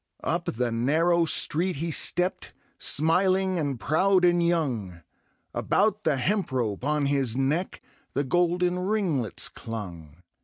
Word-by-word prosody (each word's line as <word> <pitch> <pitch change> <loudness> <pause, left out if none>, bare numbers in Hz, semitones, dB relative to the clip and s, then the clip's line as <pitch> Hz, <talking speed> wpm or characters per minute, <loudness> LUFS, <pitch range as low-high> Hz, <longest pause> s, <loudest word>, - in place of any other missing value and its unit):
Up - - -1
the 120 0 -2
narrow 160 +9 +2
street 175 +3 +1
he 165 +4 -3
steppedj 180 +4 0 0.3
Smiling 185 +4 +2
and 140 -5 -2
proud 180 - +2
and 175 0 +3
young; 125 - -1 0.5
About 210 0 0
the 150 -3 +2
hemp 195 +8 -1
rope 115 -5 -2
on 150 0 0
his 135 -4 0
neck 150 +7 -1 0.3
The 140 - +1
golden 175 +4 +1
ringlets 180 - -1
clung. 90 -8 -8
155 Hz, 125 wpm, -26 LUFS, 125-180 Hz, 0.5 s, and